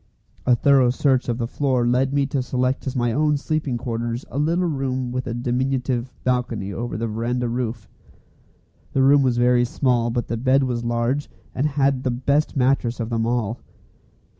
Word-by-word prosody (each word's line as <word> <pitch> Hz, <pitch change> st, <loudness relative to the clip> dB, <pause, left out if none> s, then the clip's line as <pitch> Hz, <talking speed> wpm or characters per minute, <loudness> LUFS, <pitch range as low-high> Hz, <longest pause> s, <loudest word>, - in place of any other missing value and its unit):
A 125 Hz, -, +6 dB
thorough 135 Hz, 0 st, +4 dB
search 130 Hz, 0 st, +1 dB
of 120 Hz, -, 0 dB
the 120 Hz, -, -1 dB
floor 130 Hz, 0 st, 0 dB
led 125 Hz, +2 st, +2 dB
me 140 Hz, 0 st, +2 dB
to 135 Hz, 0 st, -1 dB
select 130 Hz, +1 st, -1 dB
as 130 Hz, -, -3 dB
my 120 Hz, -2 st, +1 dB
own 150 Hz, +3 st, +2 dB
sleeping 150 Hz, -3 st, -2 dB
quarters 115 Hz, 0 st, -3 dB
a 140 Hz, -, -2 dB
little 170 Hz, +4 st, +1 dB
room 130 Hz, -5 st, -2 dB
with 130 Hz, 0 st, -3 dB
a 115 Hz, -, -2 dB
diminutive 125 Hz, 0 st, -1 dB
balcony 120 Hz, -6 st, -1 dB
over 120 Hz, +2 st, -4 dB
the 115 Hz, -, -2 dB
verandah 120 Hz, +3 st, -2 dB
roof. 115 Hz, -2 st, -3 dB, 1.1 s
The 135 Hz, -, +3 dB
room 140 Hz, +1 st, +6 dB
was 125 Hz, -3 st, +1 dB
very 120 Hz, 0 st, +4 dB
small, 120 Hz, -1 st, +1 dB
but 120 Hz, 0 st, -2 dB
the 115 Hz, -, -2 dB
bed 130 Hz, +3 st, +3 dB
was 120 Hz, -2 st, -2 dB
large, 120 Hz, +4 st, -1 dB, 0.2 s
and 135 Hz, +4 st, 0 dB
had 140 Hz, -2 st, +1 dB
the 130 Hz, -, -1 dB
best 140 Hz, +5 st, 0 dB
mattress 125 Hz, -2 st, +1 dB
of 115 Hz, 0 st, -3 dB
them 115 Hz, 0 st, 0 dB
all. 115 Hz, -1 st, -1 dB
125 Hz, 185 wpm, -22 LUFS, 120-135 Hz, 1.1 s, A